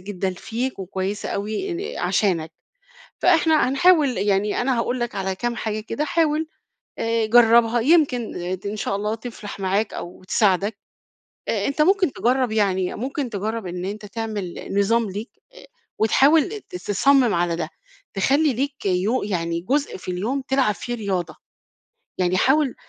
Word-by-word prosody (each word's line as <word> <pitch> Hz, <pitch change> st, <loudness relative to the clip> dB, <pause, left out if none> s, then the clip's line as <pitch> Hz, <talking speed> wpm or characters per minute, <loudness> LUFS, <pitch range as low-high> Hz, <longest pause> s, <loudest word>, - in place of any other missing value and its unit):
جدًا 190 Hz, -1 st, -3 dB
فيك 235 Hz, +7 st, -4 dB
وكويسة 190 Hz, +2 st, -3 dB
أوي 215 Hz, -, -3 dB, 0.3 s
آآ -, -, -3 dB
عشانَك، 170 Hz, -6 st, 0 dB, 0.7 s
فإحنا 320 Hz, -5 st, +4 dB
هنحاول 285 Hz, -, +4 dB
يعني 200 Hz, +1 st, +1 dB
أنا 250 Hz, 0 st, +1 dB
هاقول 245 Hz, +2 st, -1 dB
لَك 240 Hz, 0 st, -3 dB
على 190 Hz, -1 st, -2 dB
كام 240 Hz, +4 st, -3 dB
حاجة 215 Hz, -1 st, -3 dB
كده، 260 Hz, +7 st, -3 dB
حاول 315 Hz, 0 st, +1 dB, 0.5 s
آآ 230 Hz, -1 st, 0 dB
جربها 235 Hz, 0 st, +5 dB
يمكن 275 Hz, -4 st, +2 dB, 0.3 s
ت -, -, -7 dB
إن 205 Hz, +1 st, -3 dB
شاء 200 Hz, -1 st, -2 dB
الله 210 Hz, +2 st, -1 dB
تفلح 220 Hz, -3 st, -8 dB
معاك 195 Hz, +3 st, 0 dB
أو 175 Hz, +1 st, -8 dB
تساعدك، 200 Hz, +1 st, +1 dB, 0.7 s
آآ -, -, 0 dB
أنت 280 Hz, +2 st, +1 dB
ممكن 370 Hz, -2 st, +3 dB
تجرب 250 Hz, -1 st, +1 dB
يعني 190 Hz, -4 st, +1 dB
ممكن 265 Hz, +1 st, -3 dB
تجرب 215 Hz, +1 st, -3 dB
إن 180 Hz, 0 st, -5 dB
أنت 210 Hz, +2 st, -5 dB
تعمِل 210 Hz, -4 st, -5 dB
نظام 220 Hz, +1 st, +2 dB
ليك، 210 Hz, +6 st, -6 dB, 0.2 s
آآ -, -, -14 dB, 0.3 s
وتحاول 305 Hz, -, +3 dB
ت -, -, -5 dB
تصمم 240 Hz, +6 st, +3 dB
على 170 Hz, -1 st, +1 dB
ده، -, -, -3 dB, 0.5 s
تخلّي 275 Hz, +9 st, +2 dB
ليك 275 Hz, -1 st, -3 dB
يو 195 Hz, +7 st, +1 dB
يعني 170 Hz, -4 st, -2 dB
جزء 275 Hz, +10 st, -1 dB
في 185 Hz, -, -7 dB
اليوم 225 Hz, +10 st, -2 dB
تلعب 265 Hz, -6 st, +2 dB
فيه 240 Hz, -, -5 dB
رياضة، 195 Hz, -6 st, -3 dB, 0.8 s
يعني 185 Hz, 0 st, +1 dB
حاول 270 Hz, +3 st, +3 dB
220 Hz, 150 wpm, -22 LUFS, 195-265 Hz, 0.8 s, جربها